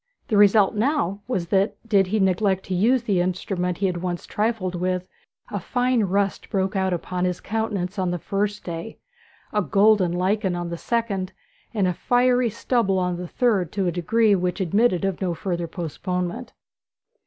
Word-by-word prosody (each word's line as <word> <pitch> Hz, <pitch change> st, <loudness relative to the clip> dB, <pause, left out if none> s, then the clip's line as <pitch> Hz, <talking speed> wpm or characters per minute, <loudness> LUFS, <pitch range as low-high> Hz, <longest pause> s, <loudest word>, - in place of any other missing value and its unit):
The 220 Hz, -, +1 dB
result 205 Hz, 0 st, +5 dB
now 210 Hz, -, 0 dB
was 185 Hz, -9 st, -2 dB
that, 195 Hz, +2 st, +2 dB
did 200 Hz, -4 st, +3 dB
he 215 Hz, +3 st, 0 dB
neglect 190 Hz, 0 st, +1 dB
to 190 Hz, -, -4 dB
use 230 Hz, +7 st, +3 dB
the 195 Hz, -6 st, +1 dB
instrument 180 Hz, 0 st, -2 dB
he 195 Hz, -2 st, +1 dB
once 175 Hz, 0 st, -4 dB
had -, -, -18 dB
trifled 210 Hz, -4 st, -1 dB
with, 180 Hz, +1 st, -2 dB, 0.4 s
a -, -, -2 dB
fine 245 Hz, -3 st, +1 dB
rust 195 Hz, +1 st, -1 dB
broke 195 Hz, +1 st, -1 dB
out 190 Hz, -1 st, +1 dB
upon 180 Hz, +1 st, -2 dB
his 180 Hz, -1 st, 0 dB
countenance 210 Hz, -3 st, -2 dB
on 185 Hz, -1 st, 0 dB
the 175 Hz, -, -1 dB
first 205 Hz, +4 st, -2 dB
day, 170 Hz, +5 st, -6 dB, 0.6 s
a 210 Hz, -, +2 dB
golden 200 Hz, -2 st, +3 dB
lichen 185 Hz, +2 st, 0 dB
on 175 Hz, -1 st, -3 dB
the 170 Hz, -, -3 dB
second, 210 Hz, -6 st, -2 dB, 0.4 s
and 205 Hz, -5 st, +1 dB
a 180 Hz, -, +1 dB
fiery 245 Hz, +4 st, +2 dB
stubble 215 Hz, -3 st, 0 dB
on 180 Hz, -1 st, 0 dB
the 180 Hz, 0 st, -5 dB
third 200 Hz, -6 st, +1 dB
to 195 Hz, -2 st, 0 dB
a 175 Hz, -, +1 dB
degree 210 Hz, +5 st, +2 dB
which 180 Hz, 0 st, 0 dB
admitted 195 Hz, +1 st, +2 dB
of 195 Hz, -1 st, -2 dB
no 180 Hz, -3 st, -1 dB
further 175 Hz, -1 st, -3 dB
postponement. 180 Hz, -, -4 dB
190 Hz, 175 wpm, -23 LUFS, 180-215 Hz, 0.6 s, result